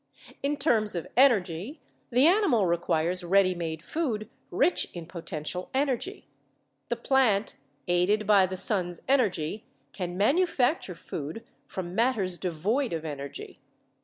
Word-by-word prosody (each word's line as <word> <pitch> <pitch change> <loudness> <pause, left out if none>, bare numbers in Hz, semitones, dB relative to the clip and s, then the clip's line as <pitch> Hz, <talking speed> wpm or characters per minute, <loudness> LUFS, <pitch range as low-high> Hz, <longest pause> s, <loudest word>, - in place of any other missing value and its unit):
In 285 +1 0
terms 225 - +1
of 170 - -3
energy, 220 - +2 0.3
the 250 +3 +4
animal 330 - +4
requires 170 +1 0
ready 185 +1 +4
made 165 -2 -5
food 230 - -3 0.2
rich 360 - +2
in 170 -1 -6
potential 170 0 -5
energy; 280 - -1 0.6
the 240 - 0
plant, 235 -4 +2 0.3
aided 180 +5 +2
by 200 -3 +5
the 185 0 -5
sun's 180 -3 0
energy, 210 - +1 0.3
can 180 -2 -4
manufacture 265 - +2
food 160 +6 -6 0.2
from 180 -2 -6
matters 210 -5 +1
devoid 195 - -1
of 160 -1 -4
energy. 140 -2 -7
195 Hz, 125 wpm, -28 LUFS, 175-250 Hz, 0.6 s, by